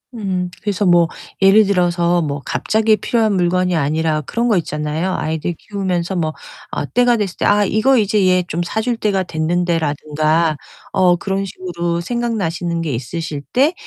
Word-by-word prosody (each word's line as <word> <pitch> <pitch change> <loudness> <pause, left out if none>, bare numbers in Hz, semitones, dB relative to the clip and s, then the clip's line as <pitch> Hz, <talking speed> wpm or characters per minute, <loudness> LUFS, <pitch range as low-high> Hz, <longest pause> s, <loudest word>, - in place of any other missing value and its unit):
음. 185 -4 -2
그래서 205 -1 -1
뭐 175 -2 +5 0.3
예를 200 +2 +6
들어서 175 -2 +2
뭐 145 -2 -2
갑자기 220 0 +2
필요한 220 -3 +1
물건이 180 0 +1
아니라 155 +1 0
그런 235 - -2
거 215 -5 +3
있잖아요. 155 +2 -2
아이들 160 +2 -2
키우면서 190 -3 -3
뭐 155 -2 -1 0.4
아 - - -2
때가 245 - +2
됐을 200 -4 -3
때 - - -1
'아 205 0 +4
이거 230 +7 +3
이제 210 -2 +2
얘 180 0 +3
좀 170 +1 -2
사줄 220 +6 -2
때가 200 -4 0
됐는데.' 170 +1 0
라든가 155 +1 0 0.4
어 180 -1 +4
그런 195 +2 -2
식으로 175 -2 -3
생각나시는 175 -6 -2
게 160 - -2
있으실 145 +5 -4
때 280 +7 +3
180 Hz, 335 characters per minute, -18 LUFS, 165-205 Hz, 0.4 s, 예를